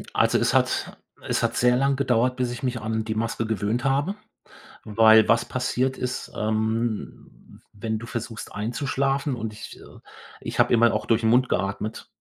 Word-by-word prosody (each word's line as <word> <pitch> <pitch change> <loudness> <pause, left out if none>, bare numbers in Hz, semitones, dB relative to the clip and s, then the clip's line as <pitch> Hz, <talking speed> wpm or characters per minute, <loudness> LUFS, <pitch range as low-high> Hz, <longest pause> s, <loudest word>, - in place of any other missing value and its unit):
Also - - +3
es - - +1
hat - - +1 0.3
es - - 0
hat - - 0
sehr 125 0 +4
lang 135 +1 +2
gedauert, 125 -2 +1
bis 125 -1 -1
ich 120 - -7
mich 125 -2 -2
an 110 0 -2
die 110 0 -3
Maske 115 0 -1
gewöhnt 110 +2 -1
habe, 140 +8 +1 0.7
weil 110 +1 +5
was 115 0 +3
passiert 125 +1 -1
ist, 125 0 -4
ähm, 110 +1 -3
wenn 110 +1 -4
du 115 - -9
versuchst 115 -1 -6
einzuschlafen 135 +5 -1
und 110 -2 -5
ich 105 - -10
äh, - - -15 0.4
ich - - -6
habe - - +4
immer 115 0 +5
auch 105 0 -2
durch 115 0 +1
'n 110 - +3
Mund 125 +2 +4
geatmet. 100 +3 -3
115 Hz, 175 wpm, -24 LUFS, 110-125 Hz, 0.7 s, weil